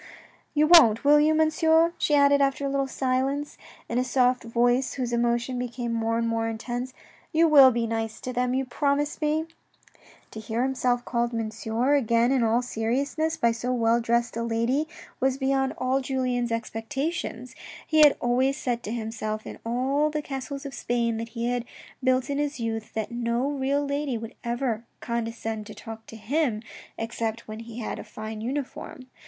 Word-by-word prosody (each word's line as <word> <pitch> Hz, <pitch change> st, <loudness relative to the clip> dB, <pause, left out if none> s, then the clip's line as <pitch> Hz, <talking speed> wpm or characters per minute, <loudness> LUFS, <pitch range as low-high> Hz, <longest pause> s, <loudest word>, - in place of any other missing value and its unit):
"You 300 Hz, +1 st, +5 dB
won't, 250 Hz, -10 st, +7 dB
will 295 Hz, +1 st, +6 dB
you, 310 Hz, +1 st, +4 dB
Monsieur," 320 Hz, +1 st, +3 dB
she 295 Hz, -, +2 dB
added 280 Hz, 0 st, +5 dB
after 275 Hz, 0 st, +1 dB
a -, -, 0 dB
little 275 Hz, 0 st, 0 dB
silence, 270 Hz, +2 st, -1 dB, 0.3 s
in 235 Hz, -, 0 dB
a -, -, +2 dB
soft 255 Hz, 0 st, +2 dB
voice 245 Hz, +3 st, +1 dB
whose 250 Hz, -3 st, -2 dB
emotion 240 Hz, +1 st, 0 dB
became 240 Hz, -1 st, -3 dB
more 230 Hz, 0 st, 0 dB
and 230 Hz, 0 st, 0 dB
more 225 Hz, 0 st, 0 dB
intense. 240 Hz, +3 st, -4 dB, 0.2 s
" -, -, -29 dB
You 330 Hz, +1 st, +5 dB
will 280 Hz, -4 st, +9 dB
be 235 Hz, -2 st, 0 dB
nice 225 Hz, -1 st, -3 dB
to 255 Hz, -, -5 dB
them, 250 Hz, +1 st, 0 dB
you 265 Hz, 0 st, 0 dB
promise 290 Hz, +5 st, -1 dB
me? 305 Hz, +1 st, +1 dB, 0.4 s
" -, -, -26 dB
To 220 Hz, -, -7 dB
hear 220 Hz, +3 st, -2 dB
himself 250 Hz, -2 st, 0 dB
called 235 Hz, -1 st, -1 dB
"Monsieur" 225 Hz, +3 st, -1 dB
again 235 Hz, -3 st, +3 dB
in 265 Hz, -2 st, +3 dB
all 230 Hz, +2 st, +2 dB
seriousness 275 Hz, +8 st, -1 dB
by 235 Hz, -, +3 dB
so 240 Hz, +2 st, -3 dB
well 235 Hz, -1 st, +2 dB
dressed 235 Hz, 0 st, 0 dB
a 230 Hz, -, -2 dB
lady 235 Hz, +6 st, 0 dB, 0.3 s
was 265 Hz, 0 st, +1 dB
beyond 270 Hz, 0 st, 0 dB
all 260 Hz, +1 st, +1 dB
Julien's 255 Hz, -2 st, -1 dB
expectations. 230 Hz, +3 st, -3 dB, 0.3 s
He 315 Hz, -, +2 dB
had 295 Hz, -2 st, +7 dB
always 260 Hz, +3 st, +1 dB
said 240 Hz, -4 st, -2 dB
to 210 Hz, -, -4 dB
himself 220 Hz, -2 st, -4 dB
in -, -, -8 dB
all 265 Hz, +6 st, +1 dB
the 305 Hz, 0 st, -3 dB
castles 275 Hz, 0 st, -5 dB
of 275 Hz, -, -6 dB
Spain 235 Hz, -2 st, -1 dB
that 230 Hz, +1 st, -5 dB
he 235 Hz, +1 st, 0 dB
had 245 Hz, -1 st, -1 dB, 0.4 s
built 255 Hz, 0 st, +2 dB
in 285 Hz, -1 st, -2 dB
his 290 Hz, -2 st, -2 dB
youth, 225 Hz, -1 st, -4 dB
that 220 Hz, 0 st, -2 dB
no 240 Hz, +3 st, -1 dB
real 280 Hz, +1 st, 0 dB
lady 280 Hz, -3 st, -1 dB
would 225 Hz, +2 st, -7 dB
ever 235 Hz, -2 st, -1 dB, 0.2 s
condescend 225 Hz, -2 st, -3 dB
to 215 Hz, -, -10 dB
talk 225 Hz, 0 st, -9 dB
to -, -, -10 dB
him 230 Hz, 0 st, -1 dB, 0.3 s
except 225 Hz, 0 st, -3 dB
when 215 Hz, 0 st, -7 dB
he 230 Hz, 0 st, -9 dB
had -, -, -4 dB
a -, -, -6 dB
fine 215 Hz, 0 st, -7 dB
uniform. 260 Hz, +1 st, -5 dB
245 Hz, 185 wpm, -26 LUFS, 230-275 Hz, 0.4 s, will